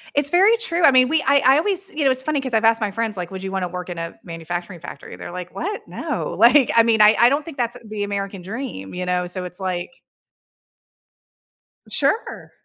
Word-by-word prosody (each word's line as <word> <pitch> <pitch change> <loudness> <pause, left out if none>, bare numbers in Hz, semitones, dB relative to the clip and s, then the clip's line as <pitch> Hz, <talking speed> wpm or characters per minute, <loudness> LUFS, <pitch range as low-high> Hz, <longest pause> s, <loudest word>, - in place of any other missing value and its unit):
It's 285 0 +2
very 390 +8 +4
true. 360 -7 -2
I 280 - +8
mean, 255 -1 +5
we 315 +3 +1
I 280 +1 +4
I 265 +2 +6
always 385 +3 -1
you 300 - -2
know, 270 - +4
it's 260 0 -1
funny 290 +1 -1
'cause 260 -2 -5
I've 220 0 +2
asked 225 0 +3
my 210 -2 -1
friends, 225 +1 -2
like, 180 -1 -5
"Would 190 0 -7
you 190 - -4
want 190 -1 -2
to 180 - -3
work 180 +1 -7
in 175 - -6
a 165 0 -6
manufacturing 175 +2 -6
factory?" - - -10
They're - - -9
like, 180 0 -8
"What, 410 +5 -4
no," - - -4
like, 245 +3 +5
I 230 - +7
mean, 225 -1 +2
I 210 0 +7
I 235 - +6
don't 285 +3 -1
think 325 -4 -9
that's 240 -1 -2
the 215 -1 -4
American 200 -1 -4
dream, 190 - -7
you 180 0 -4
know, 180 0 0
so 180 0 -1
it's 180 +1 -8
like 185 +1 -3 2.0
Sure. 455 - -1
225 Hz, 235 wpm, -21 LUFS, 180-280 Hz, 2.0 s, I